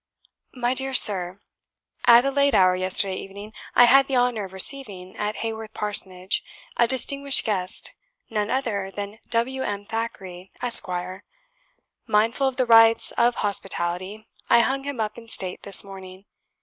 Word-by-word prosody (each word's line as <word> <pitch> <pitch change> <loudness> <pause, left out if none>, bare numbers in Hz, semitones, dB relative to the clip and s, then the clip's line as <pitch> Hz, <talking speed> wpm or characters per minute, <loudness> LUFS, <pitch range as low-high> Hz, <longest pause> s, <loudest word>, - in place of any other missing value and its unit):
"My 245 0 -1
dear 265 0 -1
Sir, 190 -4 +3 0.7
At 240 +1 +6
a 275 - 0
late 280 0 +1
hour 185 -1 +3
yesterday 185 +1 +4
evening, 200 +2 -10 0.2
I - - +6
had 270 +3 +5
the 270 - -3
honour 245 -4 0
of 190 - -13
receiving, 190 -3 +1
at 210 0 -4
Haworth 220 -1 -7
Parsonage, 190 -3 0 0.3
a 235 - +2
distinguished 275 +2 +1
guest, 185 -5 -2 0.4
none 210 -1 -3
other 215 -7 -3
than 205 +2 -8
W. 245 +3 -2
M. 205 -4 -5
Thackeray, 195 -5 -7
Esq. 240 -4 +2 1.2
Mindful 225 +5 +1
of 265 - -3
the 255 - 0
rites 225 -1 +4
of 240 +1 +1
hospitality, 195 +1 -4 0.2
I 235 - +5
hung 270 +3 -2
him 285 -4 -6
up 215 +1 -4
in 230 - -16
state 185 -5 0
this 200 - +2
morning. 190 -1 -13
215 Hz, 150 wpm, -22 LUFS, 195-245 Hz, 1.2 s, At